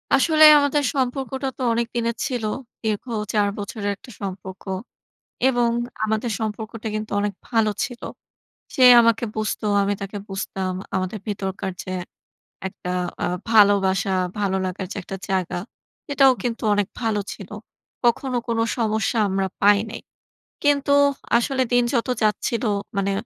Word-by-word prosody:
আসলে 310 +3 +4
আমাদের 285 0 +2
সম্পর্কটা 265 +1 -1
তো - - -8
অনেকদিনের 235 0 -1
ছিল। 245 -5 -3 0.4
দীর্ঘ 215 +2 -1 0.3
৪ 205 -1 +3
বছরের 205 0 -4
একটা 245 +5 -15
সম্পর্ক। 190 -1 -6 0.9
এবং 240 -2 +2 0.3
আমাদের 220 +2 -1
সম্পর্কটা 220 +1 -4
কিন্তু 215 -1 -4
অনেক 205 0 -1 0.2
ভালো 225 -3 +2
ছিল। 245 -3 -8 0.7
সে 260 - +1 0.2
আমাকে 230 0 +3
বুঝতো, 215 0 -2 0.2
আমি 200 +1 +1
তাকে 200 +1 -6
বুঝতাম 195 -1 -3 0.2
আমাদের 185 +3 -1
ভিতরকার 195 -2 -3
যে 185 - -8 0.8
একটা 180 -1 -8 0.3
আ - - +2 0.2
ভালোবাসা, 200 -3 +4 0.3
ভালো 195 -2 +1
লাগার 185 +1 -4
যে - - -5
একটা 195 - -6
জায়গা 185 -3 -1 0.5
এটাও 275 -2 +6
কিন্তু 240 -1 -3
অনেক 205 -1 +1
ভালো 220 -3 0
ছিল। 195 - -11 0.5
কখনো 245 +1 +1
কোন 230 -1 0 0.2
সমস্যা 220 0 0
আমরা 190 0 0
পাই 205 0 +6
নাই। 230 - -7 0.6
কিন্তু 285 -1 +2 0.5
আসলে 260 +2 0
দিন 245 0 +5
যত 235 0 +1 0.2
যাচ্ছিলো, 220 +2 0 0.3
মানে 200 0 +1
220 Hz, 135 wpm, -23 LUFS, 200-245 Hz, 0.9 s, এটাও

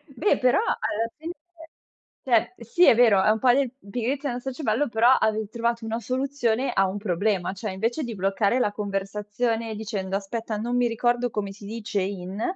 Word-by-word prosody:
Beh, 410 - +2
però 250 +5 +4
alla 225 +2 -1
fine 330 +2 -5 0.9
cioè, 240 -1 +2
sì, 235 +10 +2
è - - +7
vero, 225 -5 +5
è - - +4
un 220 +1 +3
po' 250 +2 +5
di 270 0 +2 0.2
pigrizia 260 +5 -2
nostra 250 +2 -4
cervello, 255 0 0
però 230 +2 +4
avevi 220 -4 +2
trovato 235 0 -2
una 225 +1 -2
soluzione 255 -1 -1
a 195 0 +2
un 190 - -4
problema: 195 -1 0
cioè 200 +1 -5
invece 230 +10 -1
di 235 -3 -5
bloccare 200 +5 +1
la 210 -5 +1
conversazione 210 +3 -2
dicendo: 205 -3 -3
"Aspetta 215 +2 -3
non 235 +3 -2
mi 245 -1 +3
ricordo 240 +1 +1
come 200 -2 -3
si 200 +1 -12
dice 210 -1 -3
in," 190 +1 -4
225 Hz, 180 wpm, -25 LUFS, 205-245 Hz, 0.9 s, è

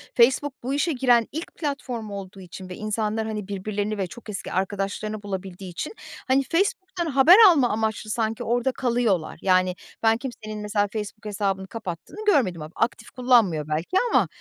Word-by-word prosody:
Facebook 265 +3 +4
bu 265 +2 -2
işe 320 +4 +1
giren 245 -3 +3
ilk 320 +4 -6
platform 265 -8 -4
olduğu 195 -1 -7
için 185 +1 -10
ve 180 - -6
insanlar 215 +1 -2
hani 210 -3 -4
birbirlerini 205 +1 -3
ve 190 -2 -1
çok 225 +4 -12
eski 200 - -5
arkadaşlarını 205 +3 -2
bulabildiği 190 -2 -6
için 250 - -5 0.3
hani 270 +1 +3
Facebook'tan 375 - -1
haber 295 +4 +7
alma 275 -8 +4
amaçlı 220 0 -1
sanki 220 0 -1
orada 245 +3 +1
kalıyorlar. 235 -10 0
Yani, 185 -1 +3 0.3
ben 225 0 +4
kimsenin, 215 -4 -6
mesela, 205 -1 0
Facebook 215 +1 -6
hesabını 195 -2 -2
kapattığını 225 - -7
görmedim 190 - +3
ama 155 +2 -8
aktif 225 -2 -1
kullanmıyor 230 - +3
belki 160 - -1
ama, - - +4
215 Hz, 160 wpm, -24 LUFS, 195-250 Hz, 0.3 s, haber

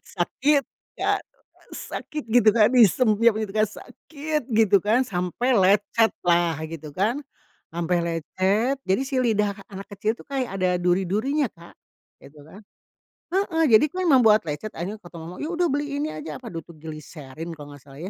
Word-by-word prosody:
Sakit 275 +11 +1 0.4
Kak, - - +1 0.5
sakit 300 -1 -6
gitu 225 -1 +5
kan, 210 0 +5
disempiap 230 -1 +4
gitu 210 -3 -4
kan, 215 - +4
sakit 300 +7 -5
gitu 215 -3 +5
kan 230 +5 +2
sampai 195 +7 0
lecet 205 +2 +3
lah 170 -2 +2
gitu 155 -2 -8
kan. 215 - 0 0.5
Sampai 170 +1 -1
lecet 185 - 0
jadi 190 +6 +1
si 265 -1 0
lidah 210 -4 +1 0.2
anak 195 -1 -9
kecil 215 +3 -1
tuh - - -14
kayak 260 -8 -3
ada 180 -1 +2
duri 180 +2 +2
durinya, 270 - 0
Kak, 170 0 -15 0.5
gitu 145 +1 -16
kan, 160 +7 -14 0.7
heeh, 365 -4 +1
jadi 220 +3 +8
tuh 365 - -6
emang 280 -6 +6
buat 220 -2 +5
lecet, 155 +8 -4
akhirnya 195 +6 -5
kata 175 - -14
mamah, 165 +2 -9
yaudah 340 +1 0
beli 290 0 -2
ini 310 - -2
aja, 300 - -7
apa 240 -4 -10
dulu 165 - -4
tuh 170 - -12
gliserin 155 0 -9
kalau 145 -1 -10
nggak 145 - -14
salah 135 +2 -12
210 Hz, 170 wpm, -24 LUFS, 175-255 Hz, 0.7 s, jadi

